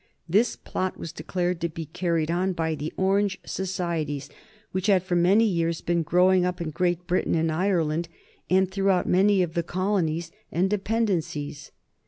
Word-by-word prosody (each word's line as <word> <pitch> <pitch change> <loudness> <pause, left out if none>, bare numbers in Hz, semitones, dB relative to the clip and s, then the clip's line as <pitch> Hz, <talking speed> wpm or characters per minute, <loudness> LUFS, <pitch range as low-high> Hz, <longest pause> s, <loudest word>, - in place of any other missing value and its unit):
This 205 +8 +2
plot 185 0 -3
was 165 - -6
declared 175 +2 -2
to 170 - 0
be 165 0 -6
carried 165 0 -1
on 185 +2 0
by 160 -2 -1
the 155 +1 -4
Orange 195 0 +2
societies 170 -6 -3 0.4
which 190 +2 -2
had 190 -3 +4
for 185 -1 -1
many 185 +6 +5
years 170 -5 0
been 170 0 +1
growing 180 +3 +4
up 180 0 -1
in 165 -2 -3
Great 175 +1 0
Britain 180 -1 +1
and 165 0 +1
Ireland, 170 -2 0 0.4
and 190 0 +3
throughout 195 -1 +1
many 195 +1 +4
of 165 -2 -4
the 170 - +1
colonies 170 -2 -1 0.2
and 185 +3 +1
dependencies. 185 -9 -1
175 Hz, 165 wpm, -26 LUFS, 165-190 Hz, 0.4 s, many